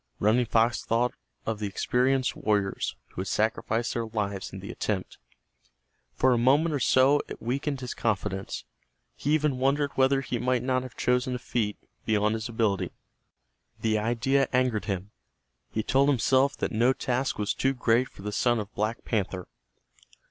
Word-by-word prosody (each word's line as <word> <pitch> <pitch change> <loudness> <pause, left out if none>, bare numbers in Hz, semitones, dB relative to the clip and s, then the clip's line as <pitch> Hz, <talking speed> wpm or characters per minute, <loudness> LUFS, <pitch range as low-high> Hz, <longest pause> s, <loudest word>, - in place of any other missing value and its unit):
Running 115 +4 +3
Fox 115 +1 +2
thought 120 +2 +1 0.3
of 110 -2 -2
the 105 - -2
experienced 130 +6 +1
warriors 100 - 0
who - - -5
had 95 - -5
sacrificed 110 +2 0
their 115 -1 -2
lives 100 -3 -3
in 95 - -7
the 100 +4 -7
attempt. 100 -5 -3 1.0
For 130 -1 +4
a 120 - +2
moment 145 +7 +3
or 145 - 0
so 130 +3 +4
it - - -8
weakened 135 +3 -2
his 125 - -4
confidence. 100 -4 -2 0.5
He 150 +2 +1
even 150 -4 0
wondered 140 +2 +2
whether 135 +1 +3
he 125 -3 -3
might 125 0 +1
not 130 0 +1
have 130 -2 -9
chosen 125 +1 +1
a - - -1
feat 115 -4 -2 0.3
beyond 105 -1 +2
his 110 +1 -3
ability. 110 -4 0 0.9
The 110 -1 +2
idea 120 +5 +1
angered 125 -4 +1
him. 100 -1 -3 0.6
He 110 - -2
told 135 +4 +3
himself 135 +1 +3
that - - -2
no 120 +4 +3
task 130 +1 -1
was 105 -1 0
too 135 +1 0
great 125 +1 +2
for 95 - -14
the 105 - -3
son 120 +2 +2
of 105 -1 -6
Black 110 +3 -2
Panther. 95 -4 -2
120 Hz, 170 wpm, -27 LUFS, 105-130 Hz, 1.0 s, For